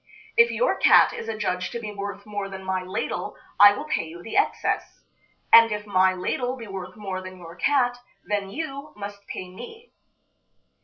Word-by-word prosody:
If 465 0 +6
your - - +1
cat - - +6
is 225 - -6
adjudged 205 -4 -2
to 235 - -3
be 215 -2 -6
worth 200 0 -6
more 205 -2 -4
than 190 0 -8
my 190 0 -1
ladle 185 +3 -4 0.2
I 205 0 +9
will - - -5
pay 165 - -1
you 170 +2 -11
the 225 - -7
excess; 410 - 0 0.5
and 230 -1 +9
if 210 0 -3
my 185 -2 +3
ladle 245 +7 -2
be 230 - -8
worth 190 -2 -7
more 195 -3 -5
than 185 0 -9
your 170 -1 -11
cat, 245 -4 +1 0.3
then 205 -2 -2
you 280 +3 -6
must 200 -1 -8
pay 185 - -6
me." 440 - -11
205 Hz, 185 wpm, -25 LUFS, 185-235 Hz, 0.5 s, I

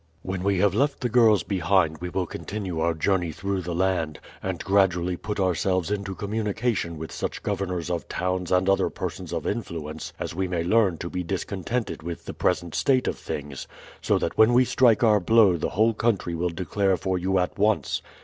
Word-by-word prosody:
"When 95 -1 -3
we 100 0 +2
have 100 0 +3
left 140 +6 +1
the 125 - 0
girls 115 -3 +5
behind 90 -5 +1
we 90 - -4
will 90 +1 -1
continue 90 +1 -5
our 85 0 +1
journey 90 0 0
through 100 +3 -3
the 85 -1 -4
land, 90 -4 0 0.2
and 95 -3 -3
gradually 90 -3 +2
put 105 +3 -5
ourselves 95 0 +1
into 100 -2 -3
communication 105 -3 -2
with 80 +1 -7
such - - -4
governors 90 -3 -2
of 85 -5 -3
towns 90 0 -2
and 90 +1 +3
other 95 0 +3
persons - - -6
of - - -3
influence 75 -2 -4
as - - -4
we 95 +2 -1
may 90 -2 -1
learn 95 -1 +3
to 85 - -5
be 90 - -2
discontented 100 +6 -3
with 85 +1 -6
the - - -6
present 85 -2 0
state 125 +11 +2
of - - -2
things, 70 -2 -6 0.3
so - - +2
that - - -3
when 110 +2 +6
we 125 +1 +5
strike 120 -3 +4
our 105 -2 +5
blow 105 0 +5
the 85 - -2
whole 110 +4 +2
country 105 -6 0
will 85 +1 -1
declare 95 +2 0
for 95 -1 -1
you 95 +2 +1
at 90 +1 -1
once. 105 +1 +1
95 Hz, 195 wpm, -25 LUFS, 85-105 Hz, 0.3 s, when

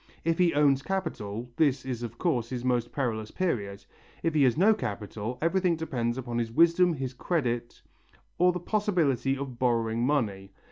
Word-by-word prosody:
If 165 +1 +1
he 175 -4 +3
owns 140 -2 +4
capital, 125 - -3
this 140 -5 +2
is 125 -3 -4
of 120 -1 -6
course 125 -9 0
his 125 -1 -4
most 120 -2 0
perilous 110 -6 -2
period; 100 - -2 0.4
if 165 - +1
he 150 - +3
has 125 0 +2
no 205 +6 +5
capital, 110 - -5
everything 180 0 +2
depends 125 -7 -2
upon 120 -2 -3
his 115 -1 -2
wisdom, 170 +4 +4
his 130 -2 -4
credit, 120 -5 -2 0.6
or 180 +1 +5
the 180 - -4
possibility 170 - +1
of 130 -3 -6
borrowing 115 -2 +1
money. 105 -8 -1
130 Hz, 170 wpm, -28 LUFS, 120-165 Hz, 0.6 s, no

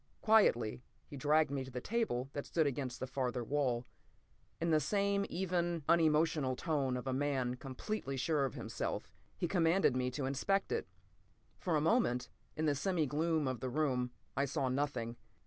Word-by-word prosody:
Quietly 125 - +4 0.2
he - - -10
dragged 150 +2 +3
me 140 -1 -1
to 130 - -9
the 125 -1 -4
table 135 - -1
that 145 - -4
stood 160 -2 +2
against 135 -3 -2
the - - -2
farther 125 -2 -2
wall. 125 -2 0 0.7
In 165 +1 0
the 155 - +5
same 200 +5 +1
even, 175 -3 -1
unemotional 155 -4 +3
tone 140 -5 0
of 125 - -6
a 130 - -1
man 135 -2 0
completely 135 +4 -4
sure 145 +1 +1
of 130 - -4
himself, - - -4 0.3
he 175 - 0
commanded 170 -4 +3
me 125 0 +1
to 130 +2 -3
inspect 195 +9 0
it. 455 - -1 0.7
For 175 -3 0
a 150 - +2
moment, 155 - +2 0.3
in 155 - 0
the 150 - +3
semi 165 +2 0
gloom 155 +1 +1
of 130 -2 -2
the 130 - -3
room, 125 -3 0 0.3
I 140 - +2
saw 135 -1 -1
nothing. 125 -4 -2
145 Hz, 175 wpm, -35 LUFS, 130-165 Hz, 0.7 s, the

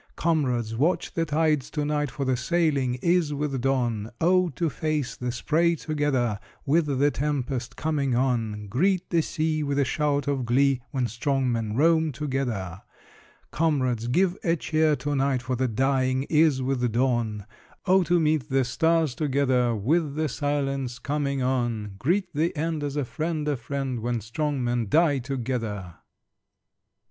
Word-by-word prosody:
Comrades, 125 -9 0
watch 165 +8 0
the 165 - 0
tides 150 -2 +1
to 150 -2 -2
night, 150 -1 0
For 140 +1 -4
the 130 -1 +2
sailing 140 -2 +1
is 170 -4 +2
with 140 -3 -2
dawn! 120 -5 0
Oh, 180 +1 +3
to 170 - 0
face 155 -2 -2
the 125 0 -3
spray 170 +7 +1
together, 140 -9 -1 0.3
With 155 +3 +2
the 140 +1 +2
tempest 135 -4 -2
coming 145 -5 0
on! 115 -5 0
Greet 180 - 0
the 170 -2 +3
sea 155 0 -1
With 140 -1 -1
a 140 - +3
shout 145 0 0
of 140 -2 0
glee, 130 +2 +2
When 130 -4 -1
strong 130 +2 0
men 110 -2 -2
roam 160 +2 +3
together! 125 - -3 0.7
Comrades, 130 -8 0
give 180 +8 +2
a 165 -1 +2
cheer 155 -1 +1
to 145 0 -3
night, 135 -2 +1
For 130 0 -2
the 130 +1 0
dying 130 +2 +1
is 150 -4 +4
with 125 -2 0
dawn! 120 -5 0 0.4
Oh, 190 +1 +5
to 175 +2 +3
meet 155 -3 +1
the 135 0 +2
stars 160 +3 +1
together, 130 -4 +1
With 145 - 0
the 155 0 0
silence 135 -4 -2
coming 140 0 -2
on! 120 -5 -1
Greet 175 - 0
the 165 +3 0
end 160 0 -1
As 145 -1 -3
a 145 -2 0
friend 155 +2 -3
a 145 - +1
friend, 130 0 -3
When 120 +1 -1
strong 135 +5 -2
men 120 -2 0
die 155 - +3
together! 115 -8 -4
140 Hz, 160 wpm, -26 LUFS, 125-155 Hz, 0.7 s, Oh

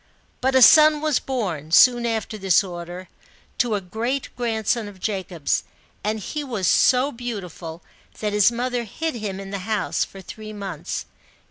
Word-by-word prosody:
But 265 +1 +1
a 260 - +7
son 305 +1 +8
was 305 -3 +1
born, 185 - -3
soon 240 +7 +6
after 225 -1 -2
this 195 -1 +3
order, 175 0 -7 0.5
to 240 -3 +2
a 200 - -2
great 230 +9 -3
grandson 225 -2 -1
of 200 -2 -12
Jacob's, 185 -6 -2 0.4
and 215 +1 -1
he 295 +8 -4
was 220 -10 -2
so 260 +7 +4
beauti 230 - -5
ful, 165 0 -9 0.4
that 210 -1 -2
his 210 +2 +5
mother 245 0 -2
hid 320 +10 -3
him 210 -5 -4
in 195 0 -8
the 200 - -3
house, 215 +2 -1
for 195 - -9
three 215 +2 -9
months. 195 -6 -5
215 Hz, 165 wpm, -23 LUFS, 190-245 Hz, 0.5 s, son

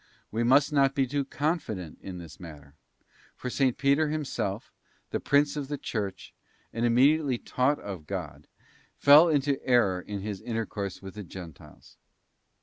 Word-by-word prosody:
We 115 +2 0
must 140 +5 +4
not 135 -1 +3
be 135 - +2
too 140 +2 -1
confident 135 - -3
in 95 -2 -7
this 80 -6 -11
matter; 75 -5 -11 0.6
for 125 - -5
S. 130 - -4 0.2
Peter 140 +3 +2
himself, 135 -9 -3 0.4
the - - -1
Prince 145 +1 +2
of 145 -2 -4
the 145 +1 -3
Church, 100 -7 -5 0.4
and 115 - -2
immediately 135 +3 +3
taught 130 +5 0
of 95 -7 -8
God, - - -6 0.5
fell 150 +4 +7
into 145 -2 +1
error 110 -8 +3
in 100 +1 -6
his 100 -2 -5
intercourse 110 -5 -4
with 95 - -8
the 105 - -7
Gentiles. 85 -4 -12
120 Hz, 150 wpm, -28 LUFS, 95-140 Hz, 0.6 s, fell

